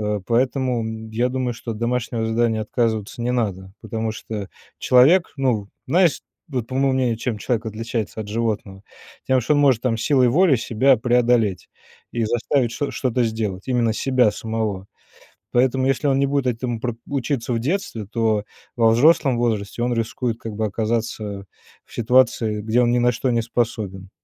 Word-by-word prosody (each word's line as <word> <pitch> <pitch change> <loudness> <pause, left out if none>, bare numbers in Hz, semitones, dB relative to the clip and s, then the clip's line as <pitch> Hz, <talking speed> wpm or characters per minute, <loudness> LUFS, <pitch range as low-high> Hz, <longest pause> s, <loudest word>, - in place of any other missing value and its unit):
Э, 105 -1 -1
поэтому, 115 -3 -1
я 120 +3 0
думаю 125 -1 -2
что 115 +1 -7
от 105 - -8
домашнего 115 -1 -1
задания 115 -1 +1
отказываться 110 0 -2
не 125 +1 0
надо, 95 -6 -2
потому 110 0 -3
что 105 -2 -6 0.3
человек, 150 +9 +4
ну 120 -7 0 0.2
Знаешь 175 -3 +3 0.3
вот 125 -5 -2
по 130 - -7
моему 135 0 +2
мнению, 125 -3 +1
чем 115 -2 -2
человек 115 0 -2
отличается 110 0 -4
от 105 - -6
животного? 105 -3 -3 0.4
Тем 130 -1 +3
что 125 +6 +1
он 145 - +3
может 130 -5 +3
там 120 -3 +1
силой 130 +1 +3
воли 160 +4 +4
себя 120 +4 +3
преодолеть, 120 -5 +1 0.4
и 115 -1 0
заставить 120 +2 0
чт 145 +2 -3
что-то 125 -1 0
сделать. 110 -4 -3
Именно 120 -3 +2
себя 125 -2 +2
самого. 110 -4 -3 0.7
Поэтому 130 +1 +2
если 140 +2 +1
он 135 -1 +3
не 140 - +2
будет 140 -2 0
этому 120 -1 -2
про 120 -1 -3
учиться 135 -3 -2
в 115 - 0
детстве, 130 - -2
то 110 -1 0 0.3
во 115 -1 +5
взрослом 135 +1 +4
возрасте 115 -2 -1
он 120 0 +1
рискует 115 +1 -2
как 110 - -6
бы 110 +1 -1
оказаться 110 -2 -3 0.4
в - - -20
ситуации 115 -3 +2
где 110 +3 +2
он 120 - +3
ни 120 - +2
на 120 0 +3
что 125 +3 -2
не 115 - +1
способен. 110 -5 -3
115 Hz, 175 wpm, -22 LUFS, 110-125 Hz, 0.7 s, во